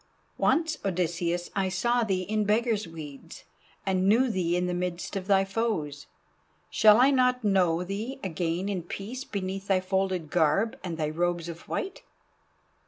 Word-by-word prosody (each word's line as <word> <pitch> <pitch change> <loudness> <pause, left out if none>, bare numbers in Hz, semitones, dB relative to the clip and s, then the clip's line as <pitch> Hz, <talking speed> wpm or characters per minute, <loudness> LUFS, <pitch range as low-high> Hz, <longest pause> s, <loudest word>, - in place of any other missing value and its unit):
Once, 320 -1 +2
Odysseus, 175 -1 -1
I 195 -2 +1
saw 240 +6 +1
thee 190 -4 0
in 215 +3 0
beggar's 215 -1 +1
weeds, 150 -4 -10 0.4
and 190 0 +2
knew 240 +4 +4
thee 175 -3 0
in 180 - 0
the 180 - -1
midst 180 +1 -3
of 190 -1 -4
thy 195 -1 +4
foes. 195 -9 -2 0.6
Shall 210 -1 +6
I 265 +3 +6
not 250 -2 +2
know 180 -4 +2
thee 210 +9 -5
again 175 +1 -2
in 195 -3 -2
peace 210 +9 -6
beneath 195 -2 -4
thy 195 -2 +3
folded 185 -3 -1
garb 175 +7 +2
and 170 -3 -4
thy 155 -2 -1
robes 175 +1 -1
of 170 0 -9
white?" 385 - -3
190 Hz, 160 wpm, -28 LUFS, 175-215 Hz, 0.6 s, Shall